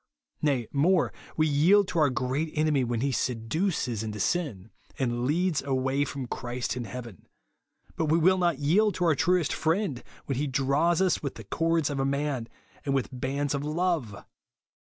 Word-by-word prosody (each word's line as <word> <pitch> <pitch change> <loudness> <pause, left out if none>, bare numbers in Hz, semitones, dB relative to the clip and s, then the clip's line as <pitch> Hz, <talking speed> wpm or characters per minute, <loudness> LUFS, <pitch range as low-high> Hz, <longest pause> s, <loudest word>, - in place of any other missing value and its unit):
Nay 135 -6 +1
more, 165 +5 +2 0.2
we 155 - +4
yield 170 +7 +4
to 170 - 0
our 150 -2 +4
great 130 +5 -1
enemy 150 -3 +2
when 120 -1 -1
he 140 +1 +1
seduces 125 - -1
into 105 -1 -5
siu, 110 - -1 0.3
and 120 -2 -1
leads 170 +2 +1
away 135 +1 0
from 135 -1 -5
Christ 120 -1 -3
and 120 -2 -4
heaven; 115 -4 -9 0.7
but 160 - 0
we 155 +2 +3
will 185 +3 +4
not 170 -5 +2
yield 180 +8 +2
to 180 - 0
our 165 - +5
truest 175 +2 +2
friend, 160 - 0 0.2
when 135 -2 -2
he 145 - 0
draws 140 +7 +2
us 185 - +1
with 140 - -4
the 110 - -9
cords 165 +7 0
of 140 - -3
a - - +2
man, 140 -3 -1 0.4
and 140 -1 0
with 135 - 0
bands 135 +3 -2
of 140 0 -2
love 155 - -1
140 Hz, 175 wpm, -27 LUFS, 125-165 Hz, 0.7 s, our